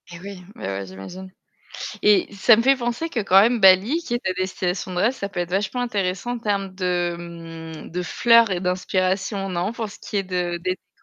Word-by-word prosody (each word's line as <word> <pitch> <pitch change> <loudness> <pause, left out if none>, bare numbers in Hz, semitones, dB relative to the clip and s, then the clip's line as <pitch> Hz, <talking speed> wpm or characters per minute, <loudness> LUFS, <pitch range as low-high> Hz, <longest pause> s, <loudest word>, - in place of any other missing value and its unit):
Eh 175 -1 -9
oui, 195 0 -9
oui, - - -11
oui, 100 0 -4
j'imagine. 175 - -9 0.7
Et 210 0 +4
ça 215 +3 +6
me 230 - +2
fait 270 +2 +5
penser 240 +6 -2
que 240 - -1
quand 195 -2 +6
même 230 +3 +3
Bali 195 - +6
qui 240 - -3
est - - +1
ta 185 - +1
destination 185 0 -3
de - - -2
rêve, 215 +7 +3
ça 200 -7 -5
peut 190 -3 -4
être 175 -1 -3
vachement 205 +6 -1
intéressant 200 -1 -2
en 245 - -3
termes 200 -4 -2
de, 180 -2 0
hem, 165 -2 -9
de 180 +2 -3
fleurs 230 +3 +4
et 180 -2 -1
d'inspiration, 185 +2 -1
non? 180 +3 -2
Pour 225 -3 -5
ce - - -12
qui - - -6
est 200 - +2
de 180 -2 -2
des 185 +1 -1 0.2
décorations - - -34
190 Hz, 225 wpm, -23 LUFS, 180-215 Hz, 0.7 s, ça